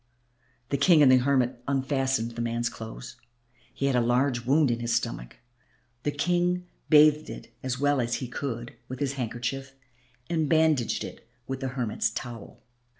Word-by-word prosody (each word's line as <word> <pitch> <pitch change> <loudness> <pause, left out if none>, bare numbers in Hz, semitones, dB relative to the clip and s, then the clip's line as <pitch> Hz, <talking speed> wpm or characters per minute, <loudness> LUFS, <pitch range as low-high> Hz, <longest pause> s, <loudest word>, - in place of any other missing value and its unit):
The 140 - 0
King 155 +1 +6
and 130 - +7
the 130 - +7
hermit 130 -1 +1
unfastened 135 -3 0
the 120 - -5
man's 120 0 -1
clothes. 115 +3 -9 0.5
He 140 - -3
had 135 -2 +2
a 125 - +4
large 120 0 +1
wound 145 -1 +4
in 115 - -1
his 120 -1 0
stomach. - - -3 0.7
The 145 - -1
King 175 +4 0 0.2
bathed 150 0 +6
it - - -9
as 130 -1 -3
well 145 -1 +2
as 120 0 -1
he 130 - -4
could 120 -2 -5
with 130 - -6
his 140 -1 -1
handkerchief 130 +2 -4 0.5
and 160 -3 0
bandaged 155 -6 +2
it - - -10 0.2
with 135 0 -4
the 135 - -3
hermit's 125 -4 -1
towel. 120 -4 -8
130 Hz, 165 wpm, -27 LUFS, 120-145 Hz, 0.7 s, and